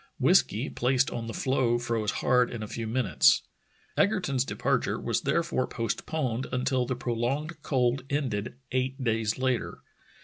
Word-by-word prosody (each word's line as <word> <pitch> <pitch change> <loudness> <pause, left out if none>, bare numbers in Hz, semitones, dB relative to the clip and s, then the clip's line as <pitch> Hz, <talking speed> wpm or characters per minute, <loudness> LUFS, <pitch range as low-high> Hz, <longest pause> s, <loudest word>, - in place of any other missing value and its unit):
Whiskey - - +3
placed 130 +1 +1
on 115 -1 -4
the - - -4
floe 130 -3 +1
froze 115 -3 -1 0.2
hard 125 -1 +4
in 115 -3 -5
a - - -5
few 115 +1 -4
minutes. 120 +1 +3 0.5
Egerton's 180 - +2
departure - - -1
was - - -1
therefore 170 -6 0
postponed 125 +2 -2
until 130 0 0
the 130 - -1
prolonged 130 +7 -2
cold 130 -2 +1
ended 120 -7 -2 0.2
eight 130 +1 -1
days 115 -2 0
later. 130 -2 -1
125 Hz, 140 wpm, -28 LUFS, 115-135 Hz, 0.5 s, hard